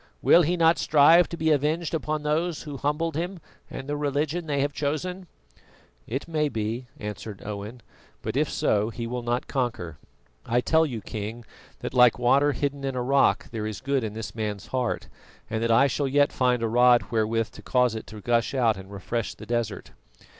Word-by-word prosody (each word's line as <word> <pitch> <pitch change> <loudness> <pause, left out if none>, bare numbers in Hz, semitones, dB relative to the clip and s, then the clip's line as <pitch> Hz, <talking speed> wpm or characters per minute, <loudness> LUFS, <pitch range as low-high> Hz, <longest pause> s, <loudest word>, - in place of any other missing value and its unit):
Will 175 - +7
he 175 +2 +1
not 165 0 +4
strive 160 +4 +5
to 170 - -6
be 160 0 +1
avenged 155 +4 0
upon 155 -1 -2
those 155 +2 -1
who 145 -3 -7
humbled 150 +3 -1
him 175 +4 -3 0.3
and 135 - -7
the 145 - -2
religion 150 +3 -1
they 145 -2 0
have 145 +1 -1
chosen?" 180 +6 -3 0.8
"It 135 +7 -4
may 155 -2 0
be," 115 +2 -3
answered 105 -1 -7
Owen, 105 +4 -6 0.4
"but - - -3
if - - +1
so, 105 +1 +1
he 115 0 -5
will 125 +1 -3
not 120 +1 -1
conquer. 115 - -3 0.4
I 120 - +1
tell 160 +5 +3
you, 120 -6 -5
King, 110 +3 -6 0.4
that - - -5
like 125 -2 +6
water 140 +4 +3
hidden 140 0 -2
in 135 -1 -2
a 125 - -1
rock 135 +2 +2
there 110 -2 -3
is 110 - -5
good 135 -1 0
in 110 -2 -4
this 110 0 -6
man's 105 -3 -4
heart, 125 -2 -2 0.4
and 110 0 -1
that 115 - 0
I 115 +4 +5
shall 140 +1 0
yet 145 +1 +3
find 125 -2 +1
a - - +2
rod 120 +1 +4
wherewith 115 0 0
to - - -12
cause 125 -2 +2
it 110 - -6
to 105 -1 -10
gush 120 +4 +1
out 115 -5 +2
and 95 +1 -11
refresh 105 +3 -3
the - - -11
desert." 115 -4 -3
125 Hz, 195 wpm, -26 LUFS, 115-150 Hz, 0.8 s, Will